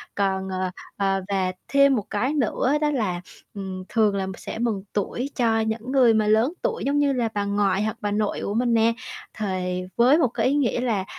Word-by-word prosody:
còn, 190 Hz, -1 st, 0 dB
ờ, 185 Hz, -1 st, -2 dB, 0.3 s
ờ, 195 Hz, -1 st, +1 dB
và 190 Hz, -2 st, 0 dB, 0.2 s
thêm 280 Hz, -1 st, +4 dB
một 210 Hz, -4 st, -2 dB
cái 250 Hz, +8 st, 0 dB
nữa 265 Hz, -8 st, 0 dB, 0.3 s
đó 300 Hz, -1 st, +2 dB
là, 195 Hz, -10 st, -1 dB, 0.3 s
ừm, 190 Hz, -2 st, -6 dB
thường 215 Hz, -3 st, +2 dB
là 190 Hz, -1 st, -1 dB
sẽ -, -, -7 dB
mừng 220 Hz, -5 st, -1 dB
tuổi 240 Hz, +6 st, -2 dB
cho 225 Hz, -3 st, +2 dB
những 220 Hz, +3 st, -2 dB
người 255 Hz, -4 st, +5 dB
mà 215 Hz, -1 st, +2 dB
lớn 220 Hz, +8 st, +3 dB
tuổi 465 Hz, -, -1 dB
giống 285 Hz, +1 st, +1 dB
như 285 Hz, -1 st, +2 dB
là 240 Hz, -3 st, 0 dB
bà 205 Hz, -1 st, -1 dB
ngoại 200 Hz, -1 st, +1 dB
hoặc 215 Hz, -, -2 dB
bà 205 Hz, -1 st, -1 dB
nội 210 Hz, 0 st, 0 dB
của 200 Hz, -, -2 dB
mình 240 Hz, +2 st, +1 dB
nè, 230 Hz, 0 st, +4 dB, 0.4 s
thì 185 Hz, -3 st, -2 dB
với 250 Hz, +5 st, +5 dB
một 320 Hz, -, +3 dB
cái 230 Hz, -, -2 dB
ý 270 Hz, -, +2 dB
nghĩa 260 Hz, -4 st, +1 dB
là, 220 Hz, -6 st, 0 dB
215 Hz, 215 wpm, -24 LUFS, 195-245 Hz, 0.4 s, người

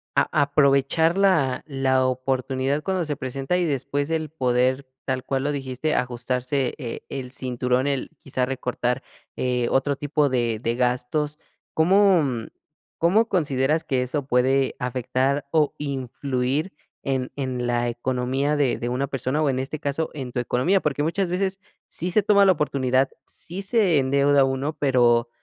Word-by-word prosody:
a -, -, +3 dB
aprovechar 145 Hz, +4 st, +3 dB
la 165 Hz, -10 st, +2 dB
la 135 Hz, -2 st, +1 dB
oportunidad 130 Hz, +2 st, -1 dB
cuando 190 Hz, -2 st, 0 dB
se 150 Hz, -1 st, -2 dB
presenta 135 Hz, +5 st, -2 dB
y 180 Hz, -, +1 dB
después 145 Hz, 0 st, -2 dB
el 160 Hz, -1 st, -1 dB
poder, 130 Hz, -1 st, +1 dB, 0.2 s
tal 130 Hz, -1 st, -2 dB
cual 135 Hz, 0 st, -1 dB
lo 145 Hz, -, 0 dB
dijiste, 135 Hz, +2 st, -2 dB
ajustarse 125 Hz, +2 st, -1 dB
e 120 Hz, -6 st, -6 dB
el 130 Hz, -2 st, -5 dB
cinturón, 125 Hz, 0 st, -1 dB
el 140 Hz, -2 st, -1 dB
quizá 130 Hz, -1 st, -1 dB
recortar, 125 Hz, -1 st, -2 dB, 0.4 s
eh, 125 Hz, -1 st, 0 dB
otro 140 Hz, +1 st, +2 dB
tipo 145 Hz, +1 st, +1 dB
de 120 Hz, -4 st, 0 dB
de 115 Hz, 0 st, -1 dB
gastos. 125 Hz, +5 st, -1 dB, 0.3 s
¿Cómo, 190 Hz, +2 st, +5 dB
mm, 120 Hz, -5 st, -3 dB, 0.5 s
cómo 205 Hz, +7 st, +3 dB
consideras 150 Hz, -2 st, +1 dB
que 130 Hz, -5 st, 0 dB
eso 130 Hz, +3 st, -2 dB
puede 130 Hz, +1 st, +2 dB
afectar 130 Hz, +2 st, -1 dB
o 155 Hz, -3 st, +2 dB
influir 135 Hz, +2 st, -2 dB, 0.3 s
en 130 Hz, -2 st, -1 dB
en 130 Hz, -3 st, -3 dB
la 120 Hz, 0 st, +1 dB
economía 130 Hz, +4 st, -1 dB
de 140 Hz, -4 st, +1 dB
de 120 Hz, -, -3 dB
una 130 Hz, +3 st, -1 dB
persona 135 Hz, +3 st, -1 dB
o 150 Hz, -, +2 dB
en 130 Hz, -1 st, 0 dB
este 135 Hz, +3 st, -4 dB
caso 145 Hz, +1 st, -2 dB
en 130 Hz, -4 st, -6 dB
tu 125 Hz, -, -2 dB
economía? 130 Hz, +11 st, +1 dB
Porque 145 Hz, -1 st, -1 dB
muchas 175 Hz, +4 st, 0 dB
veces 190 Hz, +2 st, -1 dB, 0.3 s
sí 180 Hz, +3 st, -4 dB
se 210 Hz, +3 st, +3 dB
toma 200 Hz, 0 st, +5 dB
la 190 Hz, -, +6 dB
oportunidad, 135 Hz, -4 st, +1 dB, 0.2 s
sí 180 Hz, +3 st, -7 dB
se 195 Hz, -, +3 dB
endeuda 140 Hz, +1 st, +3 dB
uno, 135 Hz, +3 st, -2 dB
pero 120 Hz, -4 st, +3 dB
135 Hz, 160 wpm, -24 LUFS, 125-150 Hz, 0.5 s, la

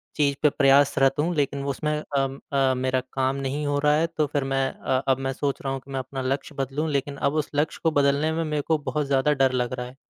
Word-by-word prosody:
चीज़ 140 Hz, -2 st, +2 dB
पे 150 Hz, -, +6 dB
प्रयासरत 135 Hz, -1 st, +4 dB
हूँ 170 Hz, +4 st, +1 dB
लेक़िन 140 Hz, -1 st, -1 dB
उसमें 150 Hz, +3 st, -2 dB, 0.3 s
अम 135 Hz, 0 st, -1 dB
अ, 135 Hz, -1 st, +3 dB
मेरा 130 Hz, 0 st, 0 dB
काम 135 Hz, 0 st, 0 dB
नहीं 140 Hz, +2 st, -3 dB
हो 145 Hz, 0 st, +1 dB
रहा 150 Hz, 0 st, +3 dB
है 165 Hz, +2 st, +2 dB
तो 155 Hz, -2 st, -1 dB
फ़िर 145 Hz, -1 st, -1 dB
मैं 135 Hz, 0 st, 0 dB
अ, 130 Hz, 0 st, -1 dB
अब 135 Hz, -1 st, +3 dB
मैं 135 Hz, -, -1 dB
सोच 140 Hz, +1 st, -2 dB
रहा 135 Hz, -2 st, -2 dB
हूँ 135 Hz, -, -3 dB
कि 140 Hz, -, -12 dB
मैं 135 Hz, -, -2 dB
अपना 130 Hz, +1 st, -5 dB
लक्ष्य 135 Hz, +3 st, -3 dB
बदलूँ 140 Hz, +4 st, -2 dB
लेक़िन 140 Hz, 0 st, -1 dB
अब 140 Hz, +1 st, 0 dB
उस -, -, -17 dB
लक्ष्य 150 Hz, +2 st, 0 dB
को 160 Hz, -, +3 dB
बदलने 145 Hz, +2 st, +2 dB
में 165 Hz, +1 st, -1 dB
मेरे 150 Hz, -2 st, -1 dB
को 160 Hz, -1 st, +3 dB
बहुत 150 Hz, 0 st, -2 dB
ज़्यादा 140 Hz, +2 st, +2 dB
डर 135 Hz, -2 st, +3 dB
लग 125 Hz, -1 st, -1 dB
रहा 125 Hz, -1 st, -4 dB
है। 125 Hz, +1 st, -11 dB
140 Hz, 255 wpm, -25 LUFS, 135-150 Hz, 0.3 s, पे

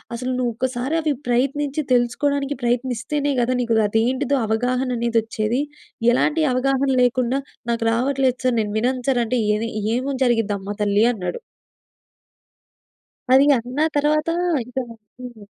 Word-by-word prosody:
అసలు, 250 Hz, +2 st, -3 dB
నువ్వు 245 Hz, -1 st, 0 dB
ఒక్కసారి 255 Hz, +4 st, -2 dB
అవి 305 Hz, -2 st, 0 dB, 0.2 s
ప్రయత్నించి, 275 Hz, +4 st, 0 dB
తెలుసుకోవడానికి 275 Hz, +3 st, 0 dB
ప్రయత్నిస్తేనే 255 Hz, +4 st, -1 dB
కదా! 245 Hz, +2 st, +1 dB
నీకు 235 Hz, -1 st, 0 dB
అదేంటిదో, 255 Hz, +6 st, +1 dB
అవగాహన 250 Hz, +4 st, 0 dB
అనేది 235 Hz, 0 st, 0 dB
వచ్చేది. 225 Hz, +3 st, -1 dB, 0.5 s
ఎలాంటి 305 Hz, +5 st, +1 dB
అవగాహన 270 Hz, +2 st, +1 dB
లేకుండా, 250 Hz, +1 st, +1 dB, 0.3 s
"నాకు 230 Hz, -1 st, -1 dB
రావట్లేదు 260 Hz, +2 st, +1 dB
సార్ 250 Hz, -2 st, +2 dB
నేను 210 Hz, -1 st, -3 dB
వినను 250 Hz, +2 st, -1 dB
సార్ 250 Hz, -3 st, +2 dB
అంటే, 250 Hz, +3 st, -1 dB, 0.2 s
ఏది 225 Hz, +2 st, -2 dB, 0.3 s
ఏమని 265 Hz, +1 st, -3 dB
జరిగిద్దమ్మా 205 Hz, -4 st, 0 dB
తల్లి" 205 Hz, +1 st, +2 dB
అన్నాడు. 210 Hz, -, -4 dB, 1.9 s
అది 270 Hz, +2 st, +7 dB
అన్న 250 Hz, +4 st, -6 dB, 0.2 s
తరువాత, 305 Hz, +2 st, +1 dB, 0.4 s
ఇంకా 250 Hz, +2 st, -4 dB, 0.4 s
హ్మ్. 240 Hz, -4 st, -10 dB
250 Hz, 125 wpm, -21 LUFS, 235-270 Hz, 1.9 s, అది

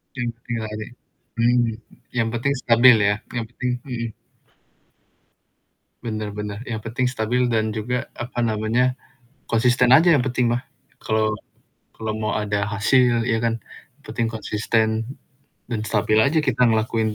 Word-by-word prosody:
Yang 120 Hz, -2 st, -2 dB
penting 115 Hz, 0 st, -5 dB
lari. 110 Hz, 0 st, -5 dB, 0.5 s
Hmm, 120 Hz, +1 st, +3 dB, 0.6 s
yang 115 Hz, -1 st, +2 dB
penting 125 Hz, +4 st, 0 dB
stabil 120 Hz, +1 st, +7 dB
ya, 105 Hz, -, +3 dB, 0.2 s
yang 115 Hz, -, -1 dB
penting 125 Hz, +1 st, -3 dB
mhm. 120 Hz, -3 st, -3 dB, 2.0 s
Bener 110 Hz, -2 st, -3 dB
bener. 105 Hz, 0 st, -5 dB
Yang 110 Hz, -2 st, -3 dB
penting 125 Hz, +2 st, 0 dB
stabil 125 Hz, +1 st, 0 dB
dan 110 Hz, -2 st, 0 dB
juga, 120 Hz, +3 st, -2 dB
apa 120 Hz, 0 st, -6 dB
namanya, 115 Hz, +3 st, +1 dB, 0.6 s
konsisten 125 Hz, +2 st, +3 dB
aja 170 Hz, +2 st, +5 dB
yang 145 Hz, -, +4 dB
penting 125 Hz, -2 st, +1 dB
mah. 120 Hz, -, 0 dB, 0.4 s
Kalau 110 Hz, 0 st, +1 dB, 0.7 s
kalau 110 Hz, -1 st, -3 dB
mau 110 Hz, -1 st, -2 dB
ada 105 Hz, 0 st, -1 dB
hasil 120 Hz, +3 st, +3 dB
ya 115 Hz, -2 st, +1 dB
kan, 115 Hz, -1 st, 0 dB, 0.5 s
penting 115 Hz, -1 st, -2 dB
konsisten 110 Hz, +2 st, -1 dB, 0.5 s
dan 115 Hz, -3 st, -1 dB
stabil 110 Hz, 0 st, +2 dB
aja 145 Hz, +7 st, +3 dB
kita 125 Hz, -3 st, +2 dB
ngelakuin 110 Hz, -1 st, +1 dB
115 Hz, 135 wpm, -22 LUFS, 110-125 Hz, 2.0 s, stabil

